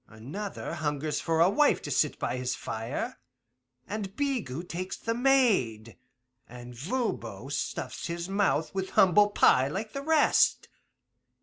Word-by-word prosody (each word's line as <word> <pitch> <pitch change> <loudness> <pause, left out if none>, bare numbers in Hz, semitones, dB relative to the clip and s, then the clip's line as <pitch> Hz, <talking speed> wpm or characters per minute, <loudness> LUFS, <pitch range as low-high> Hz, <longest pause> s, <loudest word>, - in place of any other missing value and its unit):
Another 145 - -6
hungers 150 0 -2
for 165 -1 0
a 170 - +7
wife 295 +7 +3
to - - -5
sit - - +1
by - - -2
his 125 0 -2
fire, 110 +1 -5 0.7
and 205 -2 -5
Bigot 215 - -2
takes 185 +2 -5
the 230 - -2
maid, 210 - +2 0.5
and 120 0 -10
Voban 225 - -3
stuffs - - -4
his 170 0 -4
mouth 195 -6 0
with 190 0 -3
humble 205 +2 +6
pie 135 -9 +4
like 210 +9 -5
the 275 - -4
rest. 310 +1 +3
185 Hz, 135 wpm, -28 LUFS, 135-220 Hz, 0.7 s, a